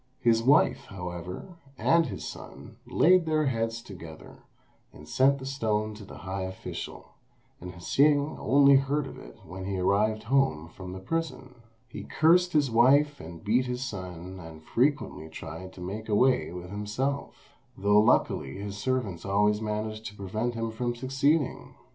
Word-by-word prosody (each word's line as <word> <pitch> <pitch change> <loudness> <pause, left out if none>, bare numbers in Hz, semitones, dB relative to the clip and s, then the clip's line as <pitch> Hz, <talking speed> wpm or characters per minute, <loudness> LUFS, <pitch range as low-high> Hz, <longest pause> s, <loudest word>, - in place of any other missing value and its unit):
His 115 -2 +3
wife, 140 +6 +4
however, 90 - -7 0.2
and 165 +2 +3
his - - -6
son, - - -10
laid 180 -1 +4
their 155 -1 +2
heads 115 -2 -1
together, 85 -7 -11 0.5
and 75 - -14
sent 135 +1 +3
the 130 - -8
stone 110 -5 -1
to 105 0 -10
the 95 - -11
high 95 +1 -3
official, 95 0 -6 0.5
and 90 +1 -8
Hsing 145 - +2
only 140 +2 +6
heard 140 +2 0
of 135 - -9
it - - -13
when 95 +3 -7
he 95 0 -2
arrived 105 +4 +1
home 115 - +1
from 90 +1 -9
the 95 - -6
prison. 160 +2 -4 0.3
He - - -8
cursed 175 +3 +3
his 145 -5 +2
wife 140 +5 +4
and 80 0 -10
beat 125 +5 +2
his 125 +1 -3
son, 90 -5 -7
and 80 -2 -11
frequently 125 - 0
tried 80 +3 -8
to 90 - -12
make 105 +5 -6
away 125 +2 +3
with 90 +1 -8
himself, 105 +8 -4 0.2
though 105 +1 +4
luckily 70 -9 +2
his 100 0 -6
servants 110 -9 -2
always 105 +2 +2
managed 110 0 -3
to 105 - -9
prevent 110 +5 -3
him 115 0 -2
from 120 +2 -2
succeeding. 135 +4 0
110 Hz, 160 wpm, -28 LUFS, 95-135 Hz, 0.5 s, only